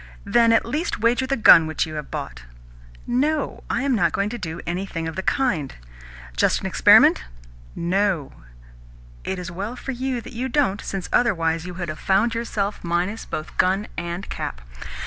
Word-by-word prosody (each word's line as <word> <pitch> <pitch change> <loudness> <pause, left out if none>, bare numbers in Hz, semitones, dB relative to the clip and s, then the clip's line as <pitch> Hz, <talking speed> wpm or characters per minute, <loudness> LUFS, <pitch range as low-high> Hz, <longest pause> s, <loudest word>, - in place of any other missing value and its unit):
"Then 230 -1 +4
at 225 - +3
least 300 +9 -2
wager 245 +3 +2
the 275 +1 0
gun 165 -7 +7
which 160 - -1
you 155 - -8
have 150 -2 -6
bought." - - -6 0.6
"No, 285 +4 -1
I 255 - 0
am 280 -1 +1
not 175 -8 +2
going 200 +1 0
to 240 +1 -6
do 165 -2 -5
anything 175 -2 -3
of 160 - -5
the 190 - -2
kind." 190 - 0 0.6
"Just - - +2
as - - -7
an - - -7
experiment?" 65 - +5 0.5
"No." 180 -3 0 0.9
"It 190 - -3
is 180 0 -6
as - - -11
well 205 +6 -4
for 270 - -5
you 255 0 -2
that 250 +2 -10
you 250 +3 -3
don't, 245 -8 +1
since, 195 -2 -5
otherwise, 165 -7 +1
you 180 - -7
would 175 -2 -4
have 155 - -6
found 205 +4 +2
yourself 215 -3 -3
minus 175 +6 -1
both 155 - -6
gun 190 +3 +2
and 175 +2 -5
cap. - - -5
195 Hz, 185 wpm, -23 LUFS, 170-235 Hz, 0.9 s, gun